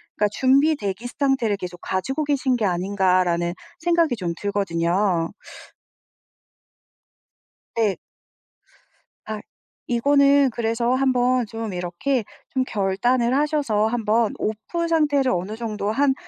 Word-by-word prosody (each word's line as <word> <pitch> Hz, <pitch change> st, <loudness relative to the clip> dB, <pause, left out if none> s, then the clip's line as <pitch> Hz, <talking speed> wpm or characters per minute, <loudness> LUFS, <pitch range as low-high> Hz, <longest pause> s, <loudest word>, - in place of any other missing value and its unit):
그러니까 210 Hz, 0 st, +1 dB
준비 275 Hz, +4 st, +4 dB
대기 205 Hz, -2 st, -4 dB
상태를 265 Hz, -5 st, 0 dB
계속 180 Hz, -2 st, -7 dB
가지고 270 Hz, +11 st, -2 dB
계신 270 Hz, -3 st, +1 dB
게 220 Hz, -, 0 dB
아닌가.'라는 180 Hz, -2 st, +1 dB, 0.3 s
생각이 335 Hz, -5 st, +2 dB
좀 175 Hz, -6 st, -3 dB
들거든요. 180 Hz, -3 st, 0 dB, 2.4 s
네. 215 Hz, -4 st, +1 dB, 1.3 s
아, 215 Hz, -1 st, -4 dB, 0.5 s
이거는 280 Hz, +2 st, +4 dB
그래서 235 Hz, +1 st, 0 dB
한번 255 Hz, -2 st, +2 dB
좀 225 Hz, -3 st, -5 dB
이렇게 180 Hz, +9 st, -1 dB, 0.3 s
좀 260 Hz, -1 st, 0 dB
결단을 235 Hz, +4 st, +1 dB
하셔서 280 Hz, -8 st, +1 dB
한번 225 Hz, -1 st, +1 dB
off 220 Hz, +11 st, -3 dB
상태를 290 Hz, -5 st, +2 dB
어느 185 Hz, +4 st, -2 dB
정도 215 Hz, -2 st, -3 dB
한 275 Hz, +3 st, +2 dB
230 Hz, 245 characters per minute, -23 LUFS, 195-270 Hz, 2.4 s, 준비